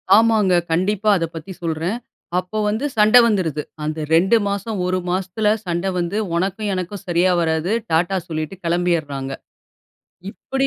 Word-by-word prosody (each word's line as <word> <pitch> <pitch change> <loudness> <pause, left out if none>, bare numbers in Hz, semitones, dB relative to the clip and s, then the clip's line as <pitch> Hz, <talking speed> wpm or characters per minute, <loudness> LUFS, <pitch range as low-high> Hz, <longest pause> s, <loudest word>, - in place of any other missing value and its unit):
ஆமாங்க, 220 -4 +4 0.2
கண்டிப்பா 205 +5 +1
அத 170 - 0
பத்தி 165 +4 -7
சொல்றேன். 165 +6 -2 0.4
அப்ப 210 +4 -3
வந்து 220 +7 -1
சண்டை 215 +4 +7
வந்துருது. 175 -9 0 0.2
அந்த 155 +1 -3
2 190 +8 +5
மாசம், 200 +1 -3
1 185 0 0
மாசத்துல 190 +3 -1 0.2
சண்டை 175 +2 -1
வந்து, 175 +4 -1 0.2
"உனக்கும் 195 +4 -1
எனக்கும் 185 +2 -4
சரியா 175 +2 +3
வராது" 160 +3 0 0.2
டாட்டா 175 +4 +2
சொல்லிட்டு 155 +2 -4
கெளம்பிட்றாங்க. 160 -6 -1 1.0
இப்டி 270 +4 -2
185 Hz, 135 wpm, -20 LUFS, 165-210 Hz, 1.0 s, சண்டை